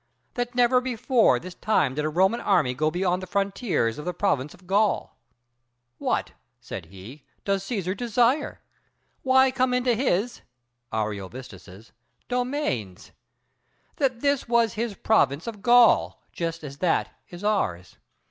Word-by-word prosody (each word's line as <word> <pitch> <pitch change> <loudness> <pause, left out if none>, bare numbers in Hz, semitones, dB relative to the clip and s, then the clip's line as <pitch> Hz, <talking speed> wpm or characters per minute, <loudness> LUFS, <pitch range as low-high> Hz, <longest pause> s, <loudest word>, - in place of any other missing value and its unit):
That 245 0 -3
never 250 +1 +4
before 245 - +2
this 180 +7 -8
time 175 -10 +1
did 150 +2 -2
a - - 0
Roman 190 +8 +2
army 165 -11 +2
go 155 +5 0
beyond 180 +2 0
the 185 - -7
frontiers 195 - -1
of 150 - -7
the 180 -1 -3
province 150 -8 -1
of 180 - -22
Gaul. 200 +3 +1 0.8
What, - - -1 0.3
said 80 - -8
he, 100 - -12 0.2
does 195 -1 0
Cæsar 195 -4 -3
desire? 245 +6 +1 0.6
why 265 0 +4
come 255 -1 +1
into 250 -1 +2
his 235 -1 0 0.5
[Ariovistus's] 105 -1 -6 0.4
domains? 245 - -3 0.9
that 260 -4 0
this 280 -3 +1
was 235 -1 +3
his 225 -1 -3
province 160 -10 +2
of 220 -3 -7
Gaul, 240 +2 +5
just 165 -1 -4
as 140 -1 -9
that 180 -3 +1 0.2
is 175 +2 -10
ours. 95 - -1
195 Hz, 140 wpm, -25 LUFS, 145-240 Hz, 0.9 s, Gaul